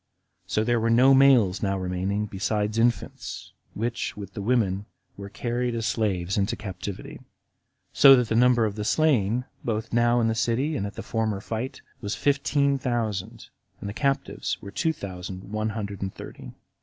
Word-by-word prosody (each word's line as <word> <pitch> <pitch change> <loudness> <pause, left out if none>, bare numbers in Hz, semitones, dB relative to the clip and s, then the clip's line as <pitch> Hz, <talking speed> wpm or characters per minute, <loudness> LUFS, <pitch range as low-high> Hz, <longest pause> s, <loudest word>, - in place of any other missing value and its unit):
So 110 - +1
there 120 +1 +2
were 115 +1 +1
no 125 +4 +6
males 130 -8 +5
now 100 -1 0
remaining, 95 +3 -1
besides 105 +2 -1
infants, 120 +1 -1 0.2
which, 115 +1 -3
with 100 -2 -8
the - - -5
women, 105 -3 +1 0.3
were 100 0 -8
carried 120 +2 -2
as 115 -1 -2
slaves 95 -4 0
into 100 - 0
captivity; 95 -1 -7 0.7
so 135 -1 +9
that 125 -2 +1
the 115 - -1
number 120 -1 +4
of 105 - -2
the 105 0 -4
slain, 125 -3 +2 0.2
both 110 -1 -3
now 120 +1 +3
in 115 - +2
the 110 - +1
city 125 +6 0
and 100 -5 -2
at 100 - -9
the - - -6
former 110 -3 -1
fight, 115 +6 -5 0.2
was 100 -1 -3
fifteen 140 0 +1
thousand, 115 -7 -3 0.3
and - - -6
the 100 - -4
captives 135 +3 -1
were 100 - -9
two 160 +9 0
thousand 95 - -7
one 110 0 -1
hundred 100 -3 -5
and 95 -1 -4
thirty. - - -9
110 Hz, 175 wpm, -26 LUFS, 100-120 Hz, 0.7 s, so